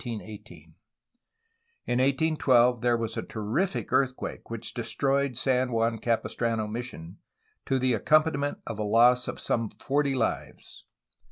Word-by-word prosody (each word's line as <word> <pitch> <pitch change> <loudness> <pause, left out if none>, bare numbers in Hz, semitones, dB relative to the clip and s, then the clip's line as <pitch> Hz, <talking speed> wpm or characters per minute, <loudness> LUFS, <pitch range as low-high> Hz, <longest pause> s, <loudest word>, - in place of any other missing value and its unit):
In 120 - -4
1812 130 - -2
there 120 -1 +2
was 115 -1 -3
a - - -1
terrific 115 - -2
earthquake 130 -1 -1
which 115 -1 -5
destroyed 135 +2 0
San 130 -1 +1
Juan 115 0 0
Capistrano 115 -1 -1
mission, 105 -7 -7 0.5
to 135 - +2
the 130 -1 +1
accompaniment 145 +4 +2
of 110 -2 -6
a - - 0
loss 120 +4 +4
of - - -5
some 115 -2 -1
forty 140 0 -1
lives. 120 -3 -4
120 Hz, 120 wpm, -27 LUFS, 115-140 Hz, 0.5 s, loss